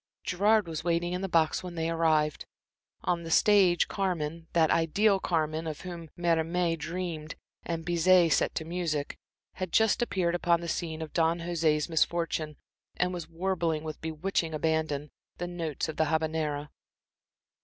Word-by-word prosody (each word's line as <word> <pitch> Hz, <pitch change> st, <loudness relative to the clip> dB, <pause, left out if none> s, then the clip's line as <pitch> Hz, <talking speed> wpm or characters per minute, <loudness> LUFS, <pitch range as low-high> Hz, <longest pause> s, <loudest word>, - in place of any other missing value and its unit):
Gerard 205 Hz, +2 st, +2 dB
was 160 Hz, -2 st, -4 dB
waiting 175 Hz, +1 st, 0 dB
in 180 Hz, -, -2 dB
the 195 Hz, -, -3 dB
box 160 Hz, -2 st, +2 dB
when 180 Hz, -1 st, -7 dB
they 165 Hz, -1 st, -1 dB
arrived. 160 Hz, -2 st, +1 dB, 0.6 s
On 175 Hz, -1 st, 0 dB
the 165 Hz, -, -7 dB
stage 190 Hz, -1 st, +4 dB
Carmen 170 Hz, -4 st, -2 dB
that 160 Hz, -2 st, +4 dB
ideal 195 Hz, +5 st, +3 dB
Carmen 160 Hz, -2 st, -1 dB
of 155 Hz, -1 st, -5 dB
whom 170 Hz, -3 st, -7 dB
Mérimée 170 Hz, 0 st, +1 dB
dreamed 165 Hz, -1 st, -5 dB, 0.3 s
and 165 Hz, -1 st, -4 dB
Bizet 175 Hz, -1 st, +4 dB
set -, -, +1 dB
to 160 Hz, -, -2 dB
music 165 Hz, -4 st, -3 dB, 0.4 s
had 185 Hz, -2 st, -3 dB
just 220 Hz, +1 st, +3 dB
appeared 185 Hz, -7 st, 0 dB
upon 175 Hz, -1 st, +2 dB
the 170 Hz, -, -6 dB
scene 160 Hz, -1 st, -3 dB
of 155 Hz, -, -9 dB
Don 165 Hz, 0 st, +2 dB
Jose's 160 Hz, -3 st, +1 dB
misfortune, 165 Hz, -2 st, 0 dB, 0.4 s
and 180 Hz, 0 st, +1 dB
was 170 Hz, -2 st, -6 dB
warbling, 170 Hz, -2 st, -1 dB
with 155 Hz, -1 st, -6 dB
bewitching 160 Hz, 0 st, -2 dB
abandon, 155 Hz, -2 st, -1 dB, 0.3 s
the 175 Hz, -, -3 dB
notes 170 Hz, -5 st, -3 dB
of 155 Hz, -, -6 dB
the 160 Hz, -, +3 dB
Habanera. 155 Hz, -2 st, -1 dB
165 Hz, 155 wpm, -29 LUFS, 160-175 Hz, 0.6 s, stage